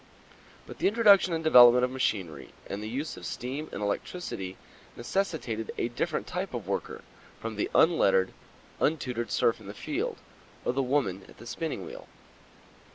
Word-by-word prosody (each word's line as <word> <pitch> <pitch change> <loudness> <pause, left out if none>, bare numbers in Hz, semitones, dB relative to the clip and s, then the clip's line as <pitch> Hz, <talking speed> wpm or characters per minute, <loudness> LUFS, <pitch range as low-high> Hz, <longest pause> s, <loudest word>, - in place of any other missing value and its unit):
But - - -11
the - - +3
introduction 200 -3 +5
and 165 -1 -1
development 125 -4 +8
of 125 - -5
machinery 95 - -2
and 100 - -5
the 110 - -5
use 140 +7 -4
of - - -10
steam 140 +5 -5
and 105 - -4
electricity 100 - -4 0.4
necessitated 120 - -2
a 115 - 0
different 150 +7 -2
type 180 -4 -4
of 110 -6 -5
worker 100 - -3 0.4
from 115 -1 -5
the 105 - -1
unlettered, 95 - +4 0.5
untutored 125 -7 0
serf 115 - +2
in 105 - -13
the 100 - -8
field 415 +11 -3 0.5
or - - +1
the 135 - +1
woman 125 -8 0
at - - -16
the - - -12
spinning 160 +6 -4
wheel. - - -10
125 Hz, 160 wpm, -28 LUFS, 105-160 Hz, 0.5 s, development